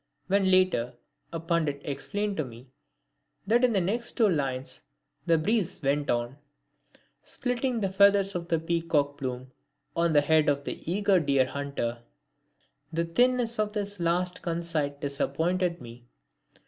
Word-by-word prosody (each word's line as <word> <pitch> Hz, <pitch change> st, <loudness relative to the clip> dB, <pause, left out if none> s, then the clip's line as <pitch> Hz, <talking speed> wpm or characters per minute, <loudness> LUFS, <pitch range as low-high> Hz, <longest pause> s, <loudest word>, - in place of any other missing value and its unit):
When, 195 Hz, 0 st, +2 dB
later, 185 Hz, -10 st, +3 dB, 0.4 s
a 165 Hz, -, -4 dB
Pandit 165 Hz, -4 st, 0 dB
explained 205 Hz, +8 st, -3 dB
to 155 Hz, -, +1 dB
me 125 Hz, 0 st, -12 dB, 0.7 s
that 235 Hz, +5 st, +3 dB
in 250 Hz, -, +5 dB
the 205 Hz, -, +2 dB
next 220 Hz, +7 st, -1 dB
two 225 Hz, -3 st, +3 dB
lines 135 Hz, -7 st, -2 dB, 0.5 s
the 165 Hz, -, +5 dB
breeze 190 Hz, +2 st, 0 dB
went 140 Hz, +1 st, 0 dB
on 120 Hz, +3 st, -1 dB, 0.8 s
"splitting 250 Hz, -1 st, -2 dB
the 195 Hz, -2 st, 0 dB
feathers 200 Hz, 0 st, +4 dB
of 170 Hz, -1 st, -4 dB
the 165 Hz, -, +2 dB
peacock 160 Hz, -3 st, 0 dB
plume 130 Hz, -1 st, -5 dB, 0.4 s
on 170 Hz, -1 st, +2 dB
the 145 Hz, -, +6 dB
head 155 Hz, +1 st, +3 dB
of 140 Hz, 0 st, 0 dB
the 160 Hz, -, -5 dB
eager 200 Hz, 0 st, +3 dB
deer 140 Hz, -4 st, +2 dB
hunter," 135 Hz, -4 st, -3 dB, 0.9 s
the 165 Hz, +1 st, 0 dB
thinness 245 Hz, +5 st, +2 dB
of 210 Hz, 0 st, 0 dB
this 205 Hz, -2 st, -3 dB
last 175 Hz, +1 st, 0 dB
conceit 165 Hz, -4 st, -2 dB
disappointed 170 Hz, +6 st, -1 dB
me. 120 Hz, 0 st, -12 dB
170 Hz, 145 wpm, -28 LUFS, 140-200 Hz, 0.9 s, the